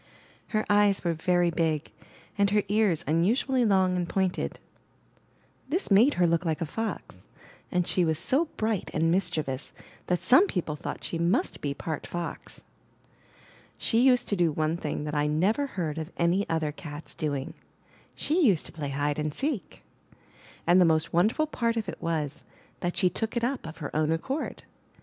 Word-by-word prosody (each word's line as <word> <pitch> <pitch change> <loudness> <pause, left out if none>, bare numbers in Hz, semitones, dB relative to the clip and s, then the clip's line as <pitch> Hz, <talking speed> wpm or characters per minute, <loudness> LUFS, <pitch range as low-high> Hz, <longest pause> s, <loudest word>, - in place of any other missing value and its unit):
Her 215 -1 -1
eyes 205 -1 +3
were 170 -2 +1
very 175 +1 +2
big, 160 -2 -1 0.4
and 200 -1 +3
her 205 0 +2
ears 205 -6 +2
unusually 230 - +2
long 190 -3 +3
and 175 -1 -2
pointed. 190 -2 -1 1.1
This 345 - -1
made 225 +9 +6
her 180 - +3
look 170 +1 +2
like 160 -3 -1
a 165 - -1
fox; 225 +8 -5 0.5
and 180 -2 +1
she 180 - +2
was 160 -2 +1
so 270 - +1
bright 215 -3 -1
and 165 +1 +2
mischievous 155 -7 -1 0.3
that 180 -1 0
some 355 +11 +6
people 165 - -2
thought - - -6
she 165 - -3
must 170 +2 0
be 140 -1 -2
part 155 -1 -5
fox. 175 -1 -6 1.1
She 225 - +2
used 250 0 +4
to 205 - +2
do 175 -3 +2
one 155 +2 0
thing 150 -3 -3
that 150 0 -4
I 150 0 +1
never 195 - +1
heard 165 - -3
of 160 +3 -6
any 175 +4 +1
other 160 -2 0
cat's 150 0 -8
doing: 145 -3 -3 0.6
she 330 +4 +1
used 195 - +3
to - - -7
play 150 -3 -5
hide 145 +2 -1
and 150 0 -1
seek. 270 - -3 0.8
And 175 +2 +5
the - - +6
most 160 -1 +1
wonderful 215 - +3
part 235 -6 -1
of 220 - -2
it - - -7
was, 155 -3 -2 0.4
that 175 0 -3
she 185 - +4
took 225 +6 -3
it 235 - -1
up 250 -7 -1
of 160 - -9
her 145 -3 -6
own 155 0 +2
accord. 265 - -3
175 Hz, 175 wpm, -27 LUFS, 155-210 Hz, 1.1 s, made